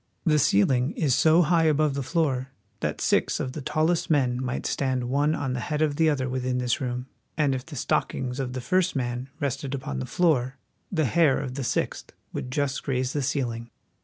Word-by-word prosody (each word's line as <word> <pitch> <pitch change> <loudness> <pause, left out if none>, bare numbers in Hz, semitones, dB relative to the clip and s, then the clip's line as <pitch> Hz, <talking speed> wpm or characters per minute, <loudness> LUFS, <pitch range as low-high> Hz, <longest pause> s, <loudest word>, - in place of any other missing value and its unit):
The 150 -3 +4
ceiling 125 +1 +3
is 145 -5 +1
so 160 +6 +5
high 165 0 +3
above 155 -1 +3
the 140 - -2
floor 135 -3 0 0.3
that - - -2
six - - +1
of 130 - -2
the 150 - -6
tallest 160 +5 0
men 130 -5 +2
might 130 0 -3
stand 130 -2 -1
one 145 +3 +2
on 135 -3 -2
the 125 - -2
head 150 +4 -1
of 150 -2 +1
the 160 -1 +4
other 135 -4 0
within 130 0 -1
this 125 +1 0
room, 125 -1 -3 0.3
and 145 -3 +2
if 130 0 -4
the 155 - -8
stockings 125 0 -1
of 125 -2 -3
the 130 - -4
first 185 +5 +1
man 125 0 -2
rested 140 -1 -2
upon 70 - -4
the 65 - -4
floor 135 -7 +1 0.3
the 160 -5 +1
hair 145 +2 +3
of 135 -2 -4
the 135 +1 -4
sixth - - -2 0.2
would 125 - -4
just 140 +1 -1
graze 130 -2 -1
the 145 - 0
ceiling. 120 -4 -2
135 Hz, 205 wpm, -26 LUFS, 125-150 Hz, 0.3 s, so